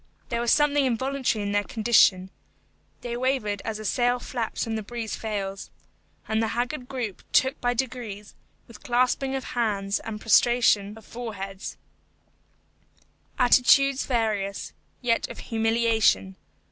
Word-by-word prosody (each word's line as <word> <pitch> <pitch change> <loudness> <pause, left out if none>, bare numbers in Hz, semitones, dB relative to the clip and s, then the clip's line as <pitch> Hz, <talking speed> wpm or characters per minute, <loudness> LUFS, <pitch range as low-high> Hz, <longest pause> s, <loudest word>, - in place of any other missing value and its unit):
There 235 -2 -1
was 235 - +2
something 290 -1 +3
involuntary 260 -2 0
in 200 - -2
their 205 0 +1
condition; 200 -4 +3 0.7
they 235 -1 -4
wavered 240 -5 -1
as 225 -1 -3
a 215 - -8
sail 245 +3 +2
flaps 240 -2 -3
when 225 - -3
the 220 - -2
breeze 225 +1 -5
fails. 200 -3 -4 0.6
And 220 0 0
the 225 - +1
haggard 250 +1 -2
group 240 -8 -5
took 265 +2 +2
by 245 0 +1
degrees, 230 -5 -4 0.3
with 230 -3 -14
clasping 255 +2 +1
of 265 - -3
hands 205 -4 -1
and 215 -1 -6
prostration 225 -2 +3
of 220 - -14
foreheads, 200 -5 -7 1.6
attitudes 265 +2 +4
various, 215 -5 -1 0.3
yet 230 -1 +1
of - - -8
humiliation. 225 - +1
230 Hz, 135 wpm, -25 LUFS, 210-250 Hz, 1.6 s, attitudes